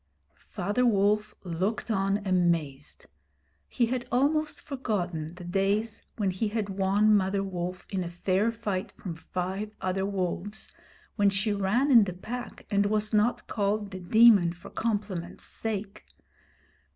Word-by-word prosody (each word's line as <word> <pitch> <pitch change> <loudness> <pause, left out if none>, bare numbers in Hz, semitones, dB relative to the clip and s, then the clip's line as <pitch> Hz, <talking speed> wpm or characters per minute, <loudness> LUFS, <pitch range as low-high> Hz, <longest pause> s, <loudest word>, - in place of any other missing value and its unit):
Father 205 +6 0
Wolf 210 -1 +2
looked 190 +6 -2
on 195 0 0
amazed. 170 -6 0 0.6
He 240 - +1
had 245 +1 -3
almost 300 +5 +1
forgotten 180 - -3
the 180 - -10
days 200 +5 0 0.2
when 200 -4 +1
he 190 +4 -1
had 210 -1 -2
won 200 +2 +3
Mother 195 0 +1
Wolf 180 -1 -4
in 185 -3 -3
fair 190 +5 +1
fight 215 -4 -3
from 180 - -6
five 185 +5 -4
other 190 +1 -1
wolves, 195 +1 -3 0.5
when 205 -2 +5
she 200 +2 0
ran 210 +8 +1
in 230 -5 +8
the 185 - -4
Pack 240 +7 -7
and 200 0 +3
was 215 +1 0
not 215 +3 +2
called 205 0 -1
The 185 - -6
Demon 200 -2 +6
for 175 - -12
compliment's 205 -6 -3
sake. 210 -2 -4
200 Hz, 140 wpm, -28 LUFS, 185-215 Hz, 0.6 s, in